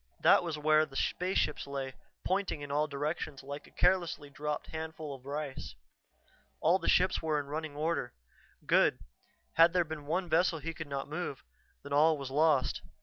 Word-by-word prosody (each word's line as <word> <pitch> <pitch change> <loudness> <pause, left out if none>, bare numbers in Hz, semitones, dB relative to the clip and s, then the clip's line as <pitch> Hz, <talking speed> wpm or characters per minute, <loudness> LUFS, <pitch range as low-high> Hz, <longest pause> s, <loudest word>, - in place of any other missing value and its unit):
That - - +6
was 165 -3 -3
where 155 +1 +4
the 135 - -15
spaceships 180 -3 0
lay, 135 -1 -4 0.3
pointing 190 -5 0
in 145 -1 -6
all 150 +2 +2
directions 145 -1 -3
like 140 +1 -7
a - - -16
carelessly 175 -5 +1
dropped 150 +1 -3
handful 160 -2 -5
of 135 0 -12
rice. 140 - -5 0.8
All 175 +4 +4
the - - -1
ships 185 +1 +3
were 155 -2 +1
in 145 - -4
running 150 +1 -5
order. 155 -4 -1 0.5
Good; - - +3 0.6
had 165 +1 +7
there 180 -2 +3
been 155 -2 -7
one 180 +4 0
vessel 165 +1 +3
he 165 +2 -5
could 160 -1 -7
not 140 -1 -3
move, 150 -3 -4 0.4
then 140 - -6
all 155 +2 +5
was 135 -2 -6
lost. 150 -2 +2
155 Hz, 175 wpm, -32 LUFS, 140-165 Hz, 0.8 s, had